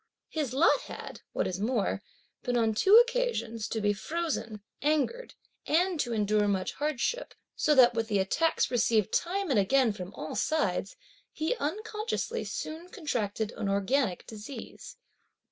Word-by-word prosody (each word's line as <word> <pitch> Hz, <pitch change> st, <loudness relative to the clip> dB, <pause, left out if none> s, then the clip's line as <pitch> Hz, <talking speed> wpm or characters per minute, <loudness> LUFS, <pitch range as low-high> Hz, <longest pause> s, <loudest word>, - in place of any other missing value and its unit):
His 300 Hz, -6 st, -2 dB
lot 310 Hz, -, +4 dB
had, -, -, -8 dB
what -, -, -1 dB
is 185 Hz, 0 st, -3 dB
more, 215 Hz, -2 st, 0 dB, 0.4 s
been 245 Hz, 0 st, 0 dB
on 225 Hz, -2 st, +2 dB
two 385 Hz, -, +5 dB
occasions 475 Hz, -, +2 dB
to 225 Hz, -, -2 dB
be 205 Hz, -1 st, +2 dB
frozen, 230 Hz, -4 st, -3 dB, 0.2 s
angered 310 Hz, -, 0 dB, 0.3 s
and 350 Hz, +1 st, +2 dB
to 245 Hz, -, 0 dB
endure 210 Hz, -1 st, +2 dB
much 190 Hz, -2 st, 0 dB
hardship, 300 Hz, -, -2 dB, 0.2 s
so 300 Hz, -, +3 dB
that 250 Hz, -2 st, +7 dB
with 225 Hz, -1 st, -1 dB
the 210 Hz, -2 st, +1 dB
attacks 260 Hz, +15 st, +1 dB
received 225 Hz, -4 st, +2 dB
time 375 Hz, -1 st, 0 dB
and 235 Hz, -, +4 dB
again 235 Hz, +3 st, +3 dB
from 185 Hz, -2 st, -7 dB
all 155 Hz, -, -6 dB
sides, 205 Hz, -, 0 dB, 0.4 s
he 315 Hz, +10 st, -1 dB
unconsciously 430 Hz, +7 st, -3 dB
soon 325 Hz, +3 st, -5 dB
contracted 225 Hz, -, -2 dB
an 210 Hz, -3 st, -3 dB
organic 200 Hz, +1 st, +1 dB
disease. 220 Hz, +5 st, -9 dB
250 Hz, 145 wpm, -29 LUFS, 210-325 Hz, 0.4 s, that